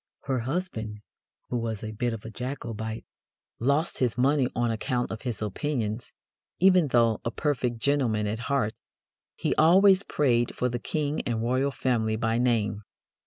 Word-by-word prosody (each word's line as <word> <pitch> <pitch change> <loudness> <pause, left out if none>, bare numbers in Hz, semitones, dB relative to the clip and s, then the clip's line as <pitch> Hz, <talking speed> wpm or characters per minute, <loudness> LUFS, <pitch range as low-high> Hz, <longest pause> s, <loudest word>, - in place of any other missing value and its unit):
Her 130 -2 0
husband, 115 - -3 0.5
who 125 - -1
was 115 -3 -3
a 110 - -4
bit 120 +3 -1
of 115 -1 -6
a 115 - -6
Jacobite, 115 -3 -5 0.5
lost 140 +7 +1
his 125 -4 +1
money 135 +1 +3
on 120 0 +1
account 120 +2 -1
of 110 - -5
his 120 -4 -3
opinions, 110 0 -2 0.5
even 185 -3 +5
though 115 -4 +3
"a - - -1
perfect 125 -3 -1
gentleman 115 -5 +1
at 105 +2 -2
heart 130 -6 +1 0.6
'he - - 0
always 190 +4 +6
prayed 120 -10 +1
for 125 - 0
the 120 0 -3
King 150 +4 -2
and 115 -2 -1
Royal 130 +4 +1
Family 115 -5 0
by 115 +1 0
name.'" 110 -4 +1
120 Hz, 160 wpm, -27 LUFS, 110-140 Hz, 0.6 s, always